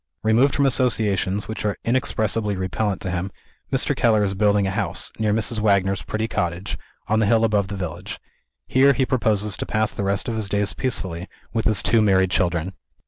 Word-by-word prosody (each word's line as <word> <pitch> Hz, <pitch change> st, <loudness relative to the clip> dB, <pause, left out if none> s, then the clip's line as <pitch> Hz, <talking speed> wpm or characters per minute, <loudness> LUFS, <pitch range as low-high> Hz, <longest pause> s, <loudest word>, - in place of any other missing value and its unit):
Removed 115 Hz, +6 st, +3 dB
from 140 Hz, -, +2 dB
associations 105 Hz, -6 st, +1 dB
which 110 Hz, -, -5 dB
are 105 Hz, -1 st, -1 dB
inexpressibly 110 Hz, -4 st, 0 dB
repellent 95 Hz, +2 st, -2 dB
to 95 Hz, -, -3 dB
him, 90 Hz, +2 st, -3 dB, 0.4 s
Mr. -, -, +2 dB
Keller 110 Hz, -3 st, +3 dB
is 100 Hz, -1 st, -1 dB
building 100 Hz, 0 st, +2 dB
a 95 Hz, -, -1 dB
house, -, -, -3 dB
near 110 Hz, -1 st, +1 dB
Mrs. 110 Hz, +1 st, +1 dB
Wagner's 100 Hz, -3 st, +2 dB
pretty 110 Hz, +5 st, -3 dB
cottage, 90 Hz, -3 st, -3 dB, 0.3 s
on 110 Hz, +1 st, +2 dB
the 110 Hz, -, +2 dB
hill 115 Hz, +1 st, +3 dB
above 105 Hz, -3 st, +2 dB
the 100 Hz, -, -5 dB
village. 90 Hz, -4 st, -6 dB, 0.5 s
Here 140 Hz, +2 st, +4 dB
he 130 Hz, +1 st, +1 dB
proposes 105 Hz, -6 st, 0 dB
to -, -, -4 dB
pass 110 Hz, 0 st, 0 dB
the -, -, -4 dB
rest 100 Hz, 0 st, 0 dB
of 115 Hz, -, -2 dB
his 110 Hz, -3 st, -3 dB
days 100 Hz, 0 st, 0 dB
peacefully, 95 Hz, -9 st, -3 dB, 0.3 s
with 115 Hz, -2 st, -1 dB
his 110 Hz, -3 st, +3 dB
two 115 Hz, -1 st, +3 dB
married 95 Hz, -3 st, +3 dB
children. 90 Hz, 0 st, 0 dB
105 Hz, 195 wpm, -22 LUFS, 95-110 Hz, 0.5 s, Here